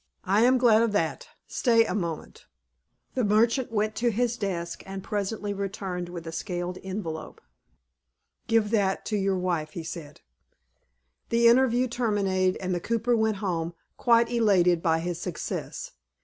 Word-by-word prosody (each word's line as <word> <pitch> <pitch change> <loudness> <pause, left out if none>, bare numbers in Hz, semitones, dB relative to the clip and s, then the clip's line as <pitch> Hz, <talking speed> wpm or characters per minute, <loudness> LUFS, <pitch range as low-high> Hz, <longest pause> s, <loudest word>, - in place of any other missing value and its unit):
"I 200 +3 +3
am 255 +1 +5
glad 230 -3 +5
of 230 -2 +1
that. 205 - -1 0.2
Stay 230 -3 +3
a - - -2
moment." 170 -6 -5 0.7
The 255 - 0
merchant 230 +4 +2
went 215 -1 0
to 240 +1 +2
his 235 +1 0
desk, 175 -6 -3
and 195 0 -6
presently 205 0 -2
returned 190 -3 -4
with 170 -2 -7
a 165 - -5
scaled 175 +1 -4
envelope. 185 -5 -5 1.1
"Give 225 -2 +2
that 200 -4 +1
to 215 - -1
your 195 -1 +1
wife," 175 -4 -2
he 170 - -5
said. 160 -3 -8 1.1
The 235 0 +4
interview 250 +1 +4
terminated, 200 -6 0
and 185 -1 -2
the 175 - 0
cooper 230 +5 0
went 220 -1 +1
home, 170 -2 -2 0.2
quite 235 -1 +3
elated 185 -7 +3
by 165 -2 +2
his 175 0 -4
success. - - -5
200 Hz, 150 wpm, -27 LUFS, 180-230 Hz, 1.1 s, am